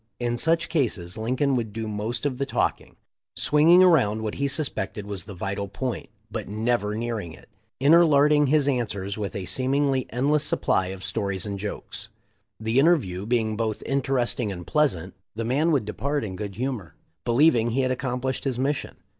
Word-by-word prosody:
In 120 -1 0
such 165 +7 +1
cases 105 - -1
Lincoln 130 +5 0
would 115 -4 -2
do 110 +1 -4
most 110 +5 -3
of 135 -3 -1
the 140 - 0
talking, - - -1 0.4
swinging 165 +5 +5
around 120 - +4
what 110 - -2
he 140 - -1
suspected 135 -7 -2
was 100 -2 -4
the 100 - -9
vital 100 +2 -3
point, 125 +3 -4 0.2
but 110 -2 -4
never 105 0 0
nearing 110 -7 -3
it, - - -16 0.3
interlarding 150 -1 +5
his 145 0 +3
answers 100 -7 -1
with 100 -2 -4
a 95 - -4
seemingly 135 +3 0
endless 145 +5 +1
supply 95 -9 +1
of 95 0 -7
stories 100 -1 -2
and 100 -1 -4
jokes. 105 +1 -6 0.5
The 110 +3 +1
interview 120 - +2
being 110 -2 +1
both 110 -1 -2
interesting 130 -5 0
and 90 -2 -7
pleasant, 95 - +1 0.2
the 115 0 -3
man 145 +8 +2
would 140 -8 +2
depart 140 +6 -2
in 95 -4 -5
good 100 -1 -5
humor, 120 - -4 0.3
believing 120 -2 +4
he 130 +4 +1
had 130 -1 +1
accomplished 130 0 -2
his 130 -3 -1
mission. 135 +2 -1
120 Hz, 170 wpm, -25 LUFS, 105-140 Hz, 0.5 s, swinging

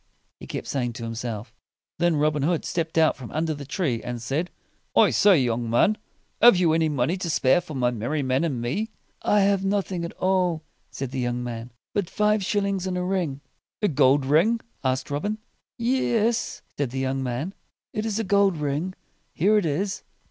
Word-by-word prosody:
he - - -10
kept - - -5
saying 125 -3 -1
to 115 - -7
himself. 115 -1 -5 0.5
Then 170 -1 +3
Robin 150 0 +1
Hood 165 +3 0
stepped 165 -2 -2
out 160 -1 +4
from 125 -4 -9
under 160 +1 -1
the 140 -2 -8
tree, 145 - -1
and 120 0 -5
said, 140 +9 -2 0.5
"I - - +6
say, 200 -4 +5
young 120 -3 0
man! 120 - +4 0.5
Have 240 -5 +8
you 170 -3 +3
any 160 -1 +2
money 145 +5 0
to 180 -2 -3
spare 145 +2 +3
for 160 -4 -9
my 125 -2 +2
merry 125 +6 -2
men 130 +3 +1
and 145 -8 -1
me?" 175 - -2 0.3
"I 210 - +3
have 195 -1 +3
nothing 195 -3 -1
at 170 - -5
all," 180 -4 +1 0.3
said 135 -2 -5
the 135 - -3
young 120 0 -1
man, 120 0 -6 0.2
"but 200 -4 -1
five 210 +1 +2
shil 205 +2 0
lings 195 -2 -1
and 180 -1 -2
a 180 - -1
ring." 180 -7 -1 0.4
"A - - +5
gold 140 -3 +4
ring?" 170 - +3 0.2
asked 130 +1 -1
Robin. 205 +10 -1 0.4
"Yes?" 235 -2 +1 0.2
said 140 -4 +1
the 130 - -6
young 135 0 -1
man, 130 +8 -3 0.4
"it 215 - -2
is 220 -2 -1
a 225 - 0
gold 200 -3 +3
ring. 150 +5 -2 0.4
Here 200 +6 +3
it 180 - -1
is." 190 +7 -1
160 Hz, 195 wpm, -25 LUFS, 130-190 Hz, 0.5 s, Have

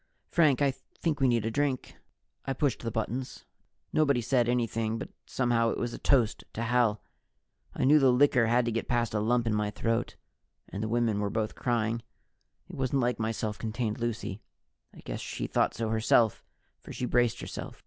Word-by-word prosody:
Frank, 145 -5 +4
I 140 - +3
think 150 +3 -4
we 135 - +4
need 120 -3 +2
a 115 - -1
drink." 140 -1 -1 0.5
I 135 - 0
pushed 135 -1 0
the 115 - -2
buttons. 120 +3 -4 0.5
Nobody 140 -5 +3
said 120 0 +1
anything, 115 -2 0
but - - -6 0.2
somehow 120 -2 +1
it - - -2
was 120 -1 -2
a - - -7
toast 125 -6 +2
to 115 - -3
Hal. 120 -2 +2 0.7
I - - -1
know 150 +3 +6
the 135 -2 +5
liquor 125 -2 +4
had 120 +1 +3
to 120 - 0
get 115 0 -2
past 120 -2 0
a 105 - +1
lump 120 +3 +1
in 110 - +1
my 105 0 0
throat 115 +3 -1 0.5
and 100 - -6
the 110 - -1
women 115 -3 +1
were 105 -1 0
both 110 +1 -2
crying. 115 -1 -1 0.7
It - - -10
wasn't 135 0 0
like 120 -1 0
my 110 0 0
self 110 -2 -4
contained 110 0 -2
Lucy. 115 -3 -3 0.5
I - - -14
guess - - -5
she - - -4
thought - - +1
so 115 -1 -2
herself, 110 0 +3 0.4
for - - -11
she 125 - -3
braced 120 -1 +2
herself. - - -7
120 Hz, 195 wpm, -29 LUFS, 110-125 Hz, 0.7 s, know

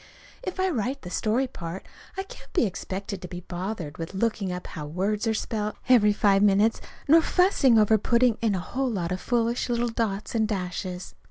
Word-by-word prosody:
If 370 -6 -5
I 375 - +2
write 270 - -2
the 180 - -7
story 225 +7 +1
part, 175 -6 -7 0.3
I 385 - -1
can't 390 - -14
be 345 - +3
expected 195 0 -5
to 180 - -6
be 175 0 -7
bothered 175 -3 -5
with 165 +3 -5
looking 205 -2 0
up 180 0 -5
how 150 -2 -7
words 200 +8 -1
are 220 - +1
spelt, 215 -1 -2
every 215 -5 +6
five 200 -1 +3
minutes, 205 +2 +3 0.3
nor 325 +3 +7
fussing 320 - +4
over 215 0 +5
putting 235 +1 +2
in 220 -4 +2
a - - -1
whole 260 +8 -2
lot 180 -6 -2
of 185 - -2
foolish 235 0 0
little 240 0 +1
dots 215 -3 -2
and 220 -2 +2
dashes. 180 -2 -4
210 Hz, 195 wpm, -26 LUFS, 185-240 Hz, 0.3 s, nor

